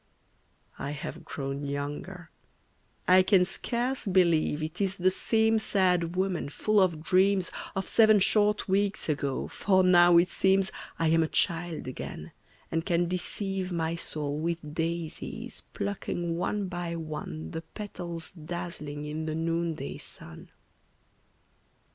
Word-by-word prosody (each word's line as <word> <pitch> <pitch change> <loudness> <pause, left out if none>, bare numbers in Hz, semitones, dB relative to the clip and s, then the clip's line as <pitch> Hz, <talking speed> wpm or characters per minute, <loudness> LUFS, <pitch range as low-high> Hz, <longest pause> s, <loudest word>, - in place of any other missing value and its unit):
I 140 +1 -3
have 145 - -6
grown 135 0 -4
younger; 145 +5 -5 0.8
I 185 +1 +7
can 185 -1 +4
scarce 240 +6 -2
believe 170 -5 +3
It 160 +5 -4
is 195 0 0
the 185 +1 +3
same 220 +3 +2
sad 180 -5 +1
woman 185 -5 -1
full 215 +7 +2
of 170 -5 +2
dreams 190 0 +3 0.2
Of 190 - -2
seven 215 -2 +6
short 210 +1 +3
weeks 195 -2 0
ago, 140 -2 -1
for 190 -2 +2
now 175 -1 +7
it 175 +2 +5
seems 190 0 +2 0.3
I 165 -1 +2
am 165 +1 +4
a 160 - +2
child 165 -1 -1
again, 130 - -6 0.4
and 165 0 0
can 175 -1 +1
deceive 185 +1 -2
My 165 -1 -1
soul 150 -3 -2
with 165 -2 -3
daisies, 165 0 -4
plucking 175 -4 -2
one 200 +3 -1
by 175 -1 -4
one 150 - -6
The 160 - -4
petals 170 -3 -6
dazzling 160 -3 -5
in 155 +1 -4
the 155 - -2
noonday 165 - -2
sun. 80 0 -10
175 Hz, 135 wpm, -28 LUFS, 160-190 Hz, 0.8 s, I